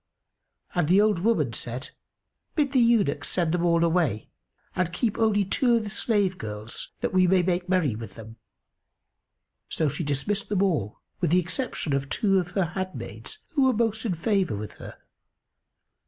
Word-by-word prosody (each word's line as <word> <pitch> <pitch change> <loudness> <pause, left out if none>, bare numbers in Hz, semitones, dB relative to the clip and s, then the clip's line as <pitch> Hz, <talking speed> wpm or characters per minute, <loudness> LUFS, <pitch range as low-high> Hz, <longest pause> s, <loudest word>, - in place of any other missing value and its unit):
and 175 -4 +1
the 185 +4 +5
old 210 -4 +3
woman 170 - +1
said, 125 +4 -5 0.6
"Bid 290 -5 +1
the 265 - +3
eunuchs 215 -12 +2
send 170 -3 +1
them 175 0 0
all 170 -1 +3
away 165 - 0 0.4
and 180 -2 0
keep 220 +4 -1
only 210 -3 +3
two 240 +5 +2
of 230 - +1
the 205 - -5
slave 205 -5 0
girls, 105 +1 -7
that - - -1
we 185 -1 +4
may 185 0 +4
make 180 0 -1
merry 180 -9 +2
with 115 +1 -8
them." 115 0 -11 1.3
So 160 - 0
she 165 - -4
dismissed 160 +9 -1
them 200 -2 +2
all, 145 - -1 0.2
with 175 -3 +1
the 180 +3 +4
exception 180 - -2
of 135 0 -1
two 195 +2 +2
of 175 -1 -3
her 190 - +3
handmaids 185 - -6
who 315 -5 0
were 260 - +4
most 220 -1 0
in 205 -7 -1
favour 190 - 0
with 105 +1 -6
her. - - -9
180 Hz, 175 wpm, -26 LUFS, 150-210 Hz, 1.3 s, the